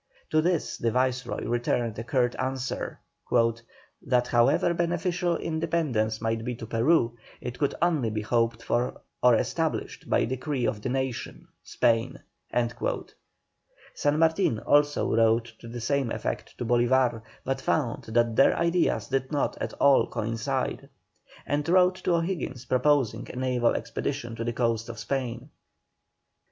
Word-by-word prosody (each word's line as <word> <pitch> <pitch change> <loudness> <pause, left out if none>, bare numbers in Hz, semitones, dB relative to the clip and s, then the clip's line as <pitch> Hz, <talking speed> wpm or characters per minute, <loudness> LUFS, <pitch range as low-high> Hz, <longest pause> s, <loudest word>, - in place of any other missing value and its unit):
To 155 - +4
this 175 0 0
the 115 - +1
Viceroy 125 +1 -1
returned 120 -2 -1
a - - -3
curt 120 0 +1
answer, 130 0 -3 1.0
"That 125 -1 +1
however 120 +8 +3
beneficial 175 0 0
independence 155 -10 -1
might 115 0 -1
be 125 0 -3
to 115 - -8
Peru, 120 +1 +2 0.2
it 125 0 -6
could 145 - 0
only 155 -10 +2
be 110 0 -3
hoped 115 0 0
for 120 +2 -1 0.2
or - - +6
established - - -2
by - - +3
decree 130 +1 -2
of 105 - -1
the 125 - -3
nation 130 -1 -3
(Spain)." 115 -1 +1 1.8
San 145 +1 +1
Martin 160 - +3
also 145 -5 +2
wrote 115 0 +2
to 115 - -11
the 120 +1 -6
same 135 +1 0
effect - - -4
to 120 - -3
Bolívar, 120 0 +2 0.2
but 135 0 -1
found 130 -6 -1
that 115 0 +1
their 135 - +5
ideas 170 +1 +1
did 135 0 -1
not 145 -2 0
at - - -3
all 140 -1 +4
coincide. 115 +4 -2 0.6
And 145 +2 -1
wrote 185 +1 +4
to 175 - +1
O'Higgins 165 -7 -2
proposing 130 -1 +1
a - - -8
naval 125 -2 +1
expedition 125 -5 -3
to 115 - -3
the 120 0 -2
coasts 115 -1 0
of 115 - -7
Spain. 120 +1 -3
125 Hz, 145 wpm, -27 LUFS, 115-145 Hz, 1.8 s, or